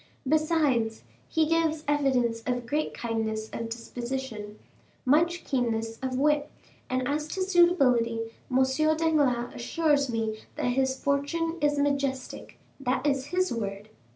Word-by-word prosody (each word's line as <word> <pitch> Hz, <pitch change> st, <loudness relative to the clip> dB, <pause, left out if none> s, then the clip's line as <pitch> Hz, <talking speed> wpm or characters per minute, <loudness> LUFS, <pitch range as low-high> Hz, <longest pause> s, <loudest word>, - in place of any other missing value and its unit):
Besides, 295 Hz, -7 st, +2 dB, 0.3 s
he 320 Hz, -1 st, +2 dB
gives 320 Hz, -1 st, +1 dB
evidence 260 Hz, -6 st, +1 dB
of 245 Hz, -1 st, -1 dB
great 300 Hz, +6 st, -1 dB
kindness 220 Hz, -2 st, -3 dB
of 230 Hz, 0 st, -4 dB
disposition, 235 Hz, -2 st, -5 dB, 0.5 s
much 335 Hz, +6 st, +3 dB
keenness 225 Hz, -3 st, -1 dB
of 260 Hz, -1 st, -2 dB
wit, 295 Hz, +1 st, +2 dB, 0.4 s
and 255 Hz, 0 st, 0 dB
as 300 Hz, +2 st, -1 dB
to 375 Hz, +4 st, -2 dB
suitability, 250 Hz, -12 st, +3 dB, 0.2 s
M. 260 Hz, +1 st, +4 dB, 0.3 s
Danglars 285 Hz, -7 st, +1 dB
assures 285 Hz, +1 st, +1 dB
me 220 Hz, -1 st, -2 dB, 0.2 s
that -, -, 0 dB
his 265 Hz, +1 st, +1 dB
fortune 325 Hz, +4 st, 0 dB
is 295 Hz, 0 st, +2 dB
majestic—that 275 Hz, -1 st, -2 dB
is 275 Hz, -2 st, +1 dB
his 365 Hz, -1 st, 0 dB
word." 205 Hz, -2 st, -4 dB
265 Hz, 125 wpm, -28 LUFS, 235-300 Hz, 0.5 s, M